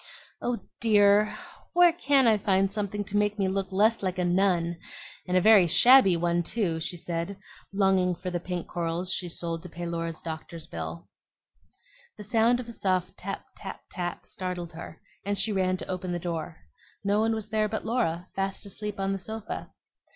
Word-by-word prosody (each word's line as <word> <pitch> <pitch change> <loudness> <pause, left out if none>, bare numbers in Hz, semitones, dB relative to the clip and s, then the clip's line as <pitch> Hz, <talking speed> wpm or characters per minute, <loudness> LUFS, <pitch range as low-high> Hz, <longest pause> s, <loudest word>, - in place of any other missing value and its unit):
"Oh 245 -1 -1 0.2
dear! 210 -1 +4 0.4
where 350 -1 +6
CAN 280 -5 +3
I 220 -2 +4
find 195 -1 +2
something 205 0 -2
to 200 - -6
make 210 0 +1
me 195 -2 +1
look 195 0 -2
less 215 +4 +3
like 185 -2 -2
a 180 - +1
nun, 175 -2 +1 0.5
and 180 0 +2
a - - +4
very 210 -3 +7
shabby 195 +2 +7
one, 170 0 +1
too?" 175 -3 -1
she 175 - -2
said, 170 +3 -4 0.3
longing 190 -2 +2
for 180 +1 -5
the 175 - -1
pink 180 0 -4
corals 175 +2 -2
she 180 - -2
sold 165 0 -3
to 180 - -10
pay 175 +2 -6
Laura's 165 -1 -3
doctor's 160 0 -7
bill. 80 +2 -6 1.1
The 210 - -8
sound 230 +3 +3
of 245 - -6
a - - -7
soft 185 -4 -1
tap, 195 +1 -6
tap, 195 - -8
tap, 175 -1 -4
startled 180 -2 -5
her, 165 0 -9 0.2
and 200 0 -1
she 220 - 0
ran 185 -2 +1
to - - -8
open 185 -1 -3
the - - -1
door. 165 -2 -4 0.5
No 200 +1 +2
one 225 +1 +2
was 215 -1 -5
there 215 -1 +1
but 220 - -4
Laura, 185 -7 0
fast 195 +1 -2
asleep 210 0 -6
on 195 0 0
the 195 - -3
sofa. 220 +2 -6
190 Hz, 190 wpm, -27 LUFS, 175-210 Hz, 1.1 s, very